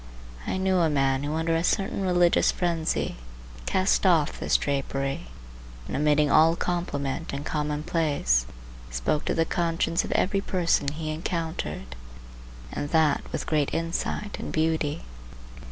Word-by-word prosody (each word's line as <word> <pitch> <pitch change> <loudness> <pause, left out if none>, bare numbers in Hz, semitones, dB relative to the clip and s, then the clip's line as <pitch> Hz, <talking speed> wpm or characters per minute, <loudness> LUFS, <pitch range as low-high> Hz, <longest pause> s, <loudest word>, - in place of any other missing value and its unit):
I - - -1
knew 190 0 +2
a 165 -2 +3
man 135 -2 +1
who 145 +2 -2
under 165 0 +1
a 165 - +1
certain 195 +2 0
religious 175 -2 +3
frenzy 170 - -1 0.5
cast 190 +1 +2
off 170 -6 +3
this - - +2
drapery, 135 - -2 0.6
and - - -4
omitting 150 0 +3
all 165 +1 +6
compliment 165 -4 -2
and 140 +2 -4
commonplace, 150 - 0 0.4
spoke - - -1
to - - 0
the 165 - +2
conscience 165 0 0
of - - -6
every 195 +1 +1
person 175 -7 +1
he 155 +2 -3
encountered, 155 - -4 0.8
and 145 - -4
that 160 -2 +3
with - - -3
great 150 -3 +1
insight 165 +5 -2
and - - -5
beauty. 160 -1 0
160 Hz, 135 wpm, -26 LUFS, 145-170 Hz, 0.8 s, all